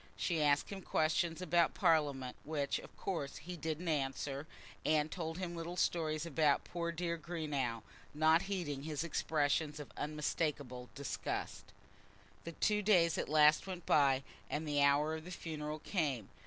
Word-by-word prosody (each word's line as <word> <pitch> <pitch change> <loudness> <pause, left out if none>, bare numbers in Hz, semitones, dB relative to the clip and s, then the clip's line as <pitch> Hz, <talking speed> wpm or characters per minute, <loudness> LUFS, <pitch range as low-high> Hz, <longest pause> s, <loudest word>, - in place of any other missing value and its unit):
She 165 -4 0
asked 145 +3 +3
him 195 -1 -5
questions 165 +1 +1
about 170 -1 +3
Parliament, 145 -8 +2
which, 145 -2 -1
of - - -13
course, 165 -8 -3
he 175 +4 -7
didn't 160 +1 -3
answer, 140 -1 -1 0.4
and 155 0 +2
told 165 -2 -4
him 180 -2 -4
little 170 +2 -5
stories 155 -3 +1
about 150 -2 +2
poor 170 -1 -3
dear 170 0 -2
Greenow, 150 -9 -2 0.3
not 160 +2 +4
heeding 160 -8 -2
his 150 +1 -3
expressions 150 -1 0
of 145 - -8
unmistakable 150 -4 -2
disgust. 140 0 -4 0.8
The 170 - -5
two 210 +5 +2
days 180 -6 +4
at - - -2
last 150 +3 +5
went 180 -3 -6
by, 135 -2 +4 0.3
and 155 +1 -2
the 145 -1 +2
hour 145 +2 +4
of 160 0 -5
the 175 - -9
funeral 155 -3 -4
came. 145 - -1
155 Hz, 155 wpm, -35 LUFS, 145-170 Hz, 0.8 s, last